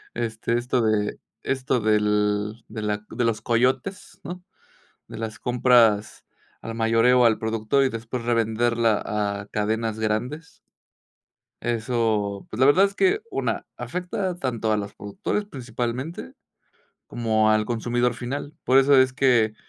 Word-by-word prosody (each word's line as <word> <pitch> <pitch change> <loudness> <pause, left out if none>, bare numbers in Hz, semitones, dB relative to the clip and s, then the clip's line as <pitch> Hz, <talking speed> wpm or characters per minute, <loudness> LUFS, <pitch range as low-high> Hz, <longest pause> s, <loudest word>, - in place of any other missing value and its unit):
Este, 115 0 -1
esto 125 +1 0
de 110 -2 0 0.2
esto 130 -2 0
del 105 +1 +1
de 110 0 -6
la 105 0 -2
de 120 +1 -1
los 110 -1 0
coyotes, 130 - -1
¿no?, 180 0 -7 0.6
de - - -9
las 110 0 -5
compras 120 -4 +3 0.4
al 115 0 -6
mayoreo 115 +2 +4
al 115 -2 +3
productor 110 +4 +1
y - - +2
después 115 +1 -5
revenderla 115 -1 +1
a 100 -1 -2
cadenas 110 +1 -1
grandes. 125 +9 -3 1.0
Eso, 110 -4 -1
pues, - - -7
la 130 - +5
verdad 180 +8 +6
es 200 0 -4
que, 390 - +2
1, - - -2
afecta 180 0 -3
tanto 120 -7 -2
a 105 - +2
los 100 -1 -5
productores 105 - -3
principalmente, 125 - -5 0.7
como 110 -2 +1
al 110 0 +3
consumidor 120 +1 0
final. 135 +4 -5
Por 130 - +5
eso 135 +1 +5
es 130 -1 +4
que, 125 -5 +3
115 Hz, 135 wpm, -24 LUFS, 110-130 Hz, 1.0 s, verdad